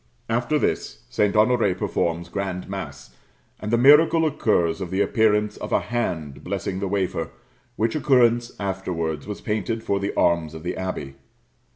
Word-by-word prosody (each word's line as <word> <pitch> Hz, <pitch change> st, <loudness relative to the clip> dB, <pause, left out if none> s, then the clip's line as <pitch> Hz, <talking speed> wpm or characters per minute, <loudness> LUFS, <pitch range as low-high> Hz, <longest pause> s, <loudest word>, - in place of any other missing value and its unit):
After 120 Hz, +6 st, +1 dB
this, -, -, -2 dB
St. 105 Hz, 0 st, +1 dB
Honoré 105 Hz, -4 st, +3 dB
performs 85 Hz, -1 st, -1 dB
grand 95 Hz, 0 st, -4 dB
mass, -, -, -7 dB, 0.4 s
and 105 Hz, -, -5 dB
the 120 Hz, -, +3 dB
miracle 160 Hz, +6 st, +6 dB
occurs 100 Hz, -, +1 dB
of 90 Hz, -, -4 dB
the 95 Hz, +2 st, -2 dB
appearance 105 Hz, 0 st, +2 dB
of -, -, -7 dB
a -, -, +4 dB
hand 80 Hz, -, -3 dB
blessing 95 Hz, +1 st, -3 dB
the 100 Hz, -, -2 dB
wafer, 95 Hz, -4 st, -1 dB, 0.5 s
which 115 Hz, 0 st, 0 dB
occurrence 120 Hz, -5 st, +3 dB
afterwards 90 Hz, -6 st, -3 dB
was 105 Hz, -, -6 dB
painted 110 Hz, +1 st, -2 dB
for 100 Hz, -3 st, 0 dB
the 100 Hz, +1 st, -2 dB
arms 85 Hz, -2 st, +1 dB
of 80 Hz, -, -8 dB
the 90 Hz, -, -3 dB
abbey. 80 Hz, -8 st, -5 dB
100 Hz, 160 wpm, -23 LUFS, 85-115 Hz, 0.5 s, miracle